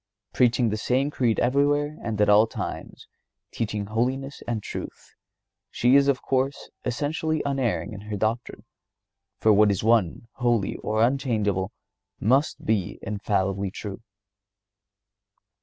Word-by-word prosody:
Preaching 120 -1 +3
the 110 - -2
same 130 +6 0
creed 120 -6 +1
everywhere 145 +3 +2
and 110 -3 -3
at 105 - +4
all 105 +2 +6
times; - - -6 0.4
teaching 105 -2 -3
holiness 130 +6 -2
and 115 -3 -2
truth, - - -8 0.6
she 125 +3 +3
is, 140 0 +5
of 135 -2 +1
course, 135 +1 -1
essentially 150 +5 -1
unerring 115 - -1
in 100 - -8
her 105 0 -5
doctrine; 110 +4 -2 0.7
for 110 - +5
what 105 +1 +5
is 100 0 0
one, 115 -2 +2
holy 120 -5 +1
or 110 +1 0
unchangeable 110 -8 0 0.5
must 135 +8 +1
be 105 -5 0
infallibly 100 -1 -1
true. 100 +2 -7
115 Hz, 125 wpm, -25 LUFS, 105-135 Hz, 0.7 s, all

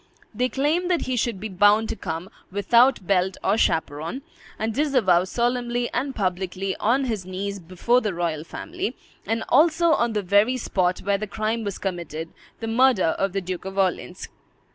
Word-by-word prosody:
They 250 +4 0
claimed 310 +7 0
that 350 -2 +1
he 255 - -2
should 230 -4 -1
be 220 - -4
bound 205 +3 +4
to - - -2
come, 170 -1 -5 0.2
"without 235 +3 +3
belt 190 0 +1
or 200 - +3
chaperon," 160 - -1 0.3
and 220 +1 -2
disavow 245 - +3
solemnly 240 +2 -1
and 265 +2 -2
publicly, 190 0 -2
on 255 +5 +2
his 220 -6 -2
knees 195 +2 -4
before 185 +8 +1
the 210 -6 -2
royal 165 -3 -2
family, 355 - -5 0.3
and 225 0 0
also 330 +4 +4
on 235 -6 +2
the 210 -1 -1
very 205 +7 +3
spot 185 -6 0
where 200 0 0
the 215 - -4
crime 220 +2 -2
was 200 -2 -4
committed, 170 -4 -4 0.3
the 225 - -3
murder 235 -6 +3
of 195 -1 0
the 195 - -1
Duke 180 -1 -5
of 190 +1 -7
Orleans. 185 -1 -1
205 Hz, 175 wpm, -24 LUFS, 185-245 Hz, 0.3 s, bound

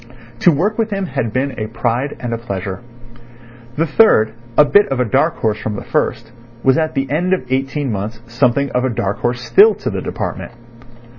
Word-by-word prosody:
To 175 - +5
work 200 +9 0
with 225 -1 +1
him 195 -2 -2
had 135 -9 -3
been 130 +4 -1
a 110 - -3
pride 120 +4 -2
and 120 -1 -4
a - - -1
pleasure. 95 -4 -5 1.0
The 160 +3 +1
third, 140 - +4 0.2
a 150 - +8
bit 205 +7 +4
of 135 -2 -2
a 125 - +2
dark 140 +8 +1
horse 110 -1 -1
from 105 - -4
the - - -6
first, 120 -6 -2 0.3
was 130 -1 +4
at 160 -1 -1
the 135 0 0
end 175 +5 +1
of 130 - -8
eighteen 135 +1 -1
months 105 +2 -4
something 125 +3 +1
of 125 - 0
a 130 - +1
dark 100 -4 -2
horse 120 0 -1
still 200 - +6
to - - -4
the - - -3
department. - - -5
130 Hz, 205 wpm, -17 LUFS, 115-155 Hz, 1.0 s, a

